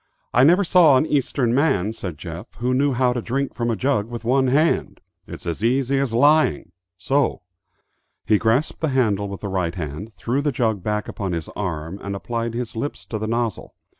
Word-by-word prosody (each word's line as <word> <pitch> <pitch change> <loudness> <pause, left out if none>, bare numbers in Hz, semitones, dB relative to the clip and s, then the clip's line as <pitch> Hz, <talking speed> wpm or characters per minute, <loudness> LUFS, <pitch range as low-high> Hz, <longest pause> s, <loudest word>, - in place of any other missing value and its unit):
"I 125 - +5
never 175 +7 +5
saw 170 -6 +6
an 130 - +2
Eastern 130 -5 0
man," 110 - +2
said 90 -8 -6
Jeff, 85 +2 -9
"who 125 +1 -1
knew 140 +2 +2
how 125 0 +2
to 120 - -2
drink 135 +4 -2
from 120 -1 -2
a 115 - +1
jug 115 -2 0
with 120 -1 -7
one 130 +2 +3
hand. 150 +6 +1 0.3
It's - - -9
as 85 +4 -4
easy 135 +3 +2
as 135 -3 -1
lying. 145 - +3 0.3
So." 135 +7 0 0.8
He 105 - +3
grasped 115 +7 +1
the 160 - +1
handle 110 -7 +1
with 100 - -7
the 100 - -4
right 90 -3 -1
hand, 85 +6 -6
threw 115 +8 -2
the 145 0 0
jug 110 -5 0
back 105 +2 -2
upon 95 -3 -4
his 85 -2 -4
arm, 85 -1 -4
and 100 0 -4
applied 115 +3 -3
his 120 -1 -4
lips 145 +6 -4
to 110 - -4
the 110 - -3
nozzle. 115 -3 -2
115 Hz, 200 wpm, -22 LUFS, 100-135 Hz, 0.8 s, saw